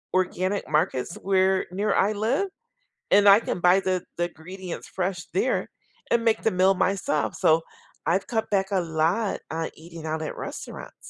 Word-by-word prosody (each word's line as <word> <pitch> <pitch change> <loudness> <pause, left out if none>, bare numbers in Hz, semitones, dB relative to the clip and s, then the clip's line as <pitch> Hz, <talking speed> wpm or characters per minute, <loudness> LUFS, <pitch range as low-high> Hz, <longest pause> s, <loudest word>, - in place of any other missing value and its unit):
organic 185 +2 0
markets 155 -1 0
where 190 0 +2
near 205 +3 0
I 205 +2 +2
live, 225 - 0 0.6
and 205 0 +7
I 200 +2 +9
can 180 - -3
buy 180 +2 +5
the 185 -2 -1
the 175 0 +1
ingredients 180 +2 -8
fresh 180 -2 -3
there 405 - 0 0.4
and 235 0 +2
make 225 - +3
the 225 - +3
meal 185 +1 +4
myself. 180 -6 0
So 160 +1 +4 0.5
I've 185 +4 +2
cut 225 -2 -1
back 195 -2 +1
a 190 -2 +2
lot 170 +6 0
on 165 0 -2
eating 165 0 -11
out 160 0 -2
at - - -5
restaurants. - - -7
185 Hz, 170 wpm, -25 LUFS, 170-200 Hz, 0.6 s, I